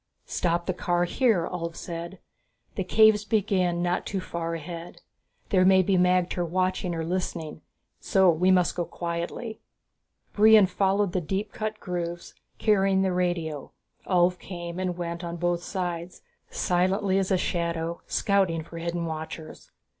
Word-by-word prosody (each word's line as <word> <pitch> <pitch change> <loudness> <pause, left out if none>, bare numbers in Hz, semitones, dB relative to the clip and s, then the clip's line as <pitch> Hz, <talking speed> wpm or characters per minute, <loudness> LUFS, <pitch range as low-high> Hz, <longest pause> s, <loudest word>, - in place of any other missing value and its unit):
"Stop 170 0 -1
the 185 - -1
car 175 -1 0
here," 195 -2 +2
Ulv 170 -2 -4
said, 170 +2 -6 0.6
"The 190 - -2
caves 215 +2 +5
begin 190 -5 +1
not 180 0 0
too 195 - -3
far 170 -2 -4
ahead. 165 +1 -8 0.5
There 185 -3 +4
may 190 0 +6
be 195 +1 +2
magter 180 0 +2
watching 185 0 -1
or 165 -1 -3
listening, 170 -3 -3 0.4
so 190 -1 +3
we 175 +3 +2
must 180 -2 +3
go 175 - 0
quietly." 170 +7 -5 0.7
Brion 215 -1 +7
followed 195 +1 +1
the 185 - -1
deep 195 +5 -3
cut 215 0 -4
grooves, 175 -1 -5 0.2
carrying 195 -3 +3
the 190 -1 +1
radio. 170 -5 -2 0.3
Ulv 180 0 +3
came 175 -1 -7
and 180 -2 -2
went 170 0 -4
on 170 0 -4
both 175 0 0
sides, 175 -2 -4 0.3
silently 190 +2 +1
as 190 - -1
a 190 - +3
shadow, 170 -1 -2
scouting 190 -5 +1
for 165 +1 -9
hidden 170 0 -2
watchers. 160 0 -7
180 Hz, 145 wpm, -26 LUFS, 170-190 Hz, 0.7 s, Brion